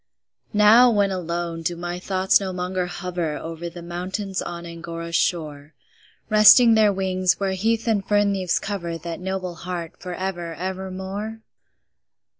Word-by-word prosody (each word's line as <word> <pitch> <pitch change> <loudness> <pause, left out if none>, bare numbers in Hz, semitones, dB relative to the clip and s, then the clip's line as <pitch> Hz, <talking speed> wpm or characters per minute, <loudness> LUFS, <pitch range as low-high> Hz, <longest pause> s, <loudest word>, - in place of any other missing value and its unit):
Now, 220 +4 +7
when 205 -3 +2
alone, 170 -2 -3
do 170 +1 -2
my 175 +1 -5
thoughts 190 0 +2
no 195 -2 -4
longer 180 0 -2
hover 175 -4 -3
Over 165 +1 -6
the 170 0 -10
mountains 185 +3 -4
on 170 0 -6
Angora's 170 0 -6
shore, 150 -4 -1 0.5
Resting 215 +2 +7
their 215 -2 +5
wings, 185 -1 0
where 195 -1 0
heath 225 +5 0
and 210 -3 +1
fern 205 0 +2
leaves 185 -3 0
cover 175 -5 -4
That 165 0 -6
noble 185 -1 -3
heart 170 -1 -6
for 180 -1 -5
ever, 175 -3 -4
ever 190 +2 -4
more? 200 +4 -6
185 Hz, 150 wpm, -23 LUFS, 170-195 Hz, 0.5 s, Now